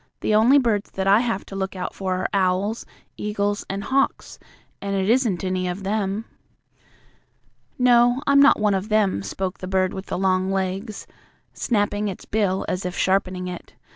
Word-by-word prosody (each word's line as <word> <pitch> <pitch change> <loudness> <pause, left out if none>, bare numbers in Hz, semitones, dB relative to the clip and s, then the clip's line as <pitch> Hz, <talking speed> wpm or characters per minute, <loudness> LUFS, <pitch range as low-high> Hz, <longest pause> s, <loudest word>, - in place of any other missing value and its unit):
The - - 0
only 230 +6 +6
birds 225 -7 +1
that 190 - -3
I 200 +2 +5
have 230 -5 -2
to 195 - -9
look 195 0 -3
out 180 -1 -4
for 190 -1 -2
are 185 - -2
owls, 195 +3 0 0.3
eagles 205 -1 -2
and 195 +1 -3
hawks, 270 +3 -1 0.4
and 200 0 -2
it 190 0 0
isn't 225 -6 +2
any 185 -1 -1
of 180 +2 -4
them." 205 +1 -2 1.5
"No, 245 +1 +4
I'm 280 0 +5
not 280 0 +6
one 210 -1 +2
of 195 +2 -2
them," 210 - +2
spoke 185 - -4
the 185 - -6
bird 185 -1 +1
with 190 0 -7
the - - -3
long 185 0 +1
legs, 195 +3 -3 0.5
snapping 205 -2 0
its 195 - -6
bill 200 -3 0
as 180 - -2
if 180 0 -4
sharpening 185 -1 0
it. 180 -1 -8
195 Hz, 175 wpm, -23 LUFS, 185-215 Hz, 1.5 s, only